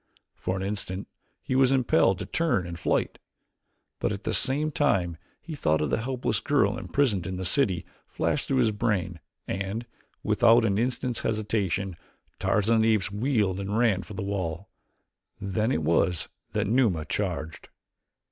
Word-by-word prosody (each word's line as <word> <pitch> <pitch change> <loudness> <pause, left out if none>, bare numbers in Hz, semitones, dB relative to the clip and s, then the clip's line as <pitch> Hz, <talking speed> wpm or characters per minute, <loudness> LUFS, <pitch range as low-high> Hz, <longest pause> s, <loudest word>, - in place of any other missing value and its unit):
For 90 - -3
an 95 - -3
instant 100 -1 -3 0.4
he 130 - -2
was 130 0 +4
impelled 125 -7 +3
to - - -5
turn 140 - 0
and 85 0 -7
fight, - - 0 0.8
but - - 0
at 100 0 -5
the - - -1
same 145 +4 +2
time 95 - +1 0.3
the 165 - -6
thought 80 - +1
of 75 -2 -1
the - - +1
helpless 125 -3 -1
girl 145 +1 +2
imprisoned 110 -11 0
in 95 - -3
the 95 - -4
city 90 -4 +1 0.2
flashed - - -1
through 135 - +1
his 110 - +2
brain 100 -6 -1 0.3
and, 100 +5 -3 0.4
without 115 0 +5
an 100 -1 +1
instant's 125 0 -1
hesitation, 100 -4 -1 0.4
Tarzan 110 +3 +2
of - - +3
the 110 0 +4
Apes 100 -1 -2
wheeled 105 -4 0
and 100 +2 -2
ran 110 -6 +3
for 100 +2 -10
the 95 - -3
wall. 95 -2 -3 0.7
Then 105 +4 -1
it 80 - 0
was 85 +2 +1 0.2
that 105 0 0
Numa 105 -8 +2
charged. 80 -4 -3
105 Hz, 165 wpm, -27 LUFS, 95-120 Hz, 0.8 s, without